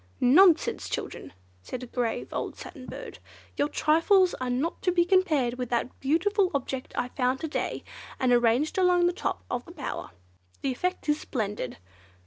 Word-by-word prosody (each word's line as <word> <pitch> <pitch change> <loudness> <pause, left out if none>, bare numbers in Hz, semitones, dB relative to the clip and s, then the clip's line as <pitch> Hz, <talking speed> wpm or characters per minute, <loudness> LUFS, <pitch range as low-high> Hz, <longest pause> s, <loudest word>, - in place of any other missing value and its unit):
"Nonsense, 330 +7 +5
children!" - - -5 0.3
said 250 - -6
a - - -4
grave 240 -1 -2
old - - -3
Satin 270 -7 -10
Bird, - - -8 0.4
"your 285 - +1
trifles 350 +6 +4
are 255 - -1
not 265 +7 -1
to 365 - +2
be 345 -1 +3
compared 310 -10 +2
with 250 -2 -3
that 240 +1 -2
beautiful 365 +8 +2
object 265 -1 -3
I 245 - -1
found 255 0 0
to 320 - -2
day 305 - -3 0.4
and 255 -2 +2
arranged 245 +8 +3
along 360 -1 +4
the 350 - +2
top - - -3
of 245 0 -3
the - - -11
bower. 305 -6 -5 0.5
The 275 - +1
effect 360 +6 -2
is 295 0 +2
splendid!" 210 - -3
285 Hz, 170 wpm, -27 LUFS, 250-350 Hz, 0.5 s, Nonsense